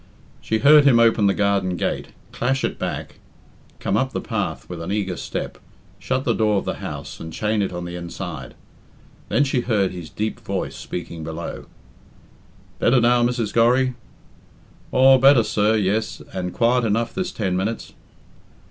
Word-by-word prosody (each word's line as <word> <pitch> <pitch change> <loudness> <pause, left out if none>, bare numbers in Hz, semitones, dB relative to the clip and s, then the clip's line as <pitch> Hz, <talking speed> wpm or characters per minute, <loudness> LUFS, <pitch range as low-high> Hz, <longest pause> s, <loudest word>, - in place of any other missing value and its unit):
She 110 - 0
heard 145 +4 +7
him 125 -4 +6
open 115 -3 +4
the 100 - +3
garden 100 -3 +1
gate, - - -2 0.2
clash 130 +2 -1
it - - -2
back, - - -5 0.6
come - - -1
up - - 0
the - - -1
path - - -3
with 85 -2 -7
an 85 - -4
eager 100 -3 -1
step, - - -5 0.4
shut 130 0 -1
the - - +1
door 105 -2 +2
of - - -2
the - - -3
house - - -6
and 80 - -7
chain 105 +5 0
it 100 - -1
on 90 0 -5
the 85 0 -6
inside. 85 -6 -7 0.7
Then 145 - +3
she 135 -3 0
heard 105 -6 +1
his 90 -4 -8
deep 110 +5 -3
voice - - -4
speaking 85 -2 -6
below. 80 +1 -6 1.1
"Better 125 +1 +4
now, 120 0 +4
Mrs. 120 -3 0
Gorry?" 125 +3 +3 1.0
"Aw, 130 +1 +6
better, 135 -2 +6
sir, 105 +1 +2
yes, 105 +1 0
and 90 -1 -3
quiet 120 +4 +2
enough 115 +1 0
this 185 -1 -2
ten 95 -4 -2
minutes." 105 +5 -3
110 Hz, 165 wpm, -22 LUFS, 95-120 Hz, 1.1 s, heard